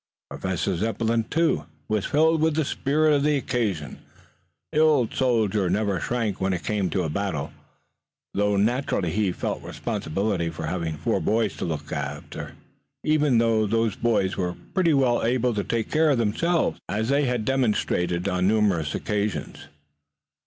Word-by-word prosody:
Professor 95 0 -2
Zepplin, 115 +4 0
too, 165 +1 +1 0.2
was 105 -2 0
filled 160 +2 +3
with 160 -1 +2
the 160 -2 +1
spirit 150 +3 +2
of 145 - +3
the 150 0 +2
occasion. 105 - -2 0.7
The 150 - +1
old 150 -7 +3
soldier 110 -7 +1
never 100 -1 0
shrank 115 -4 -2
when 95 0 +1
it 90 - -3
came 105 -3 0
to 95 - 0
a 80 - -2
battle, 80 -5 -2 0.8
though 105 0 +1
naturally 105 - +1
he 105 0 +1
felt - - -3
the - - -11
responsibility 95 0 -2
of 80 - -6
having 80 -1 -3
four - - 0
boys 110 -2 0
to - - -3
look 75 -3 -4
after, 70 +1 -5 0.5
even 150 -5 +3
though 115 -2 +3
those 115 -1 +1
boys 105 -5 +1
were 90 -2 -1 0.2
pretty 170 -5 +3
well 125 -3 +2
able 125 +1 +1
to 105 -2 -1
take 115 0 -2
care 155 0 +3
of 140 - +3
themselves, 160 +10 +1
as 110 +5 -1
they 140 +1 +3
had 125 -4 -1
demonstrated 105 -9 0
on 90 0 +1
numerous 100 -8 +2
occasions. 105 -1 -3
110 Hz, 160 wpm, -25 LUFS, 95-130 Hz, 0.8 s, filled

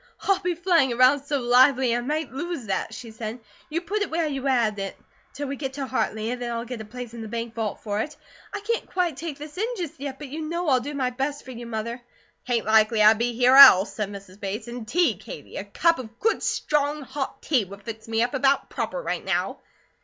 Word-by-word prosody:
"I'll 390 -1 +2
be 355 -1 -1
flying 335 -6 +3
around 255 +4 +4
so 285 -1 0
lively 250 0 +4
I 240 - 0
might 300 +2 -2
lose 335 -2 -4
that," 195 -2 -2
she 235 -3 -8
said, 220 +1 -6 0.3
"you 325 +3 -1
put 405 +5 -2
it 410 - 0
where 330 +1 0
you 275 -2 -2
had 230 -6 +2
it, 195 -1 -5 0.3
till 290 - -5
we 275 - -3
get 270 -1 -4
to 275 0 -3
Hartley, 225 -3 -1
and 250 0 -4
then 240 -1 -3
I'll 230 0 -3
get 245 -2 -6
a - - -8
place 240 +1 -8
in 235 - -7
the 220 - -6
bank 230 +1 -4
vault 225 -3 -3
for 205 -1 -2
it. 295 +6 -4 0.3
I 410 - -5
can't 460 +3 -2
quite 355 -5 0
take 300 0 -5
this 300 +4 -9
in, 460 +4 -1
just 335 -7 -5
yet, 275 -1 -5
but 290 -1 -8
you 310 +4 -5
know 335 +1 -2
I'll 260 -2 +4
do 285 +4 -6
my 255 -2 0
best 275 +3 -3
for 260 - -8
you, 240 -1 -8
Mother!" 235 +2 -4 0.5
"Tain't 235 -3 0
likely 220 0 +4
I'd 215 +1 +7
be 240 +1 0
here 250 +2 +4
else," 255 -9 +10
said 210 -2 -3
Mrs. 200 -1 -11
Bates, 205 +3 -4
"and 235 -2 -7
tea, 350 +8 +2
Katie. - - -9
A - - -3
cup 335 -4 +2
of 235 -2 -9
good 450 - +1
strong 295 0 0
hot 270 +1 -5
tea 255 -9 +2
would 200 +2 -12
fix 225 0 -8
me 225 0 +1
up 245 - -2
about 275 +1 +2
proper, - - -3
right - - -2
now." - - -1
255 Hz, 245 wpm, -25 LUFS, 225-295 Hz, 0.5 s, else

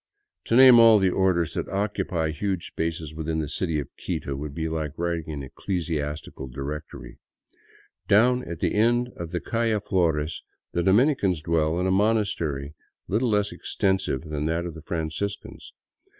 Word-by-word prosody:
to 115 - +1
name 130 -1 +9
all 115 -1 +8
the 95 -2 +2
orders, 90 -4 +1
that - - -3
occupy 95 -5 -1
huge 95 +3 -2
spaces 80 -2 -4
within 80 0 -3
the 80 -2 -1
city 80 0 -1
of 70 - -4 0.2
Quito 70 - -3
would 70 0 -6
be 80 0 -2
like 80 -2 -4
writing 85 -2 -2
an 70 -2 -5
ecclesiastical 75 -2 -4
directory. 70 +4 -7 0.9
Down 125 +4 +4
at 85 -1 -6
the - - +1
end 120 +3 +2
of 85 -1 -6
the 90 - -2
calle 115 0 0
Flores 85 -6 0 0.3
the 85 - 0
Dominicans 95 - +3
dwell 80 0 +1
in 90 - 0
a 95 - +2
monastery 95 -9 0 0.3
little 115 +5 +1
less 105 -1 +1
extensive 95 -7 -1
than 75 -2 -3
that 85 +2 -1
of 85 - -5
the 80 - -10
Franciscans. 85 +5 -4
85 Hz, 160 wpm, -25 LUFS, 80-100 Hz, 0.9 s, name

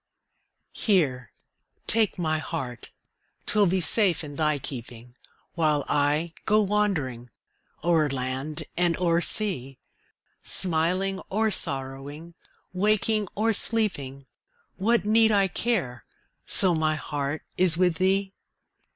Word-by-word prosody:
Here, 135 - +1 0.5
take 220 -3 +2
my 155 -3 0
heart 130 -8 -6 0.6
'twill 210 -2 +3
be 185 +2 +1
safe 185 -1 +3
in 145 -1 -8
thy 150 -1 +1
keeping, 120 -3 -8 0.4
While 150 -4 +1
I 150 +3 +1
go 215 0 +4
wandering 185 - -1 0.5
o'er 160 -3 +3
land 135 +3 -4
and 175 -1 +1
o'er 170 -1 +2
sea; 160 - -1 0.6
Smiling 185 +3 0
or 220 +2 +1
sorrowing, 140 +2 -3 0.4
waking 210 +2 +1
or 225 +2 +1
sleeping, 145 - 0 0.5
What 215 +1 +1
need 220 +1 +4
I 200 -2 +3
care, 180 - -1 0.4
so 185 -2 +4
my 155 -1 +1
heart 145 0 -4
is 175 -3 +3
with 180 -2 +2
thee? 190 +1 +1
170 Hz, 110 wpm, -26 LUFS, 145-195 Hz, 0.6 s, go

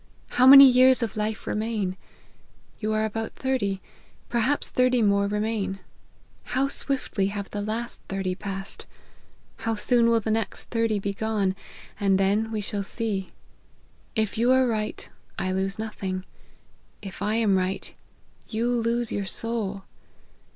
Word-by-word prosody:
How 255 +1 +4
many 275 +1 +12
years 255 -1 +6
of 225 - -3
life 215 0 -3
remain? 210 -4 -2 0.8
You 215 -1 -1
are 215 0 +1
about 225 +1 -4
thirty, 205 -8 -1 0.5
perhaps 240 +5 +1
thirty 255 0 +2
more 200 -1 +3
remain. 210 -1 -1 0.8
How 270 +2 +2
swiftly 260 -9 0
have 200 0 -5
the 205 - -3
last 225 +3 -4
thirty 195 -1 -2
passed: 195 0 -6 0.7
how 225 0 -2
soon 235 +2 +3
will 230 0 +4
the 220 0 -2
next 225 0 -2
thirty 230 -2 +1
be 200 0 -2
gone: 205 -2 -1 0.4
and 195 -2 +3
then 205 +3 +1
we 215 -1 -2
shall 205 0 -3
see. 200 -2 -3 0.9
If 220 -1 -1
you 240 +2 +4
are 260 0 +5
right, 215 -3 -2 0.3
I 185 - -1
lose 190 +1 -1
nothing; 195 -4 -4 0.8
if 195 -1 -8
I 210 +2 0
am 220 -4 +3
right, 185 +1 -2 0.5
you 235 +2 -1
lose 235 0 0
your 200 - -2
soul. 205 -2 -3
215 Hz, 145 wpm, -25 LUFS, 195-230 Hz, 0.9 s, many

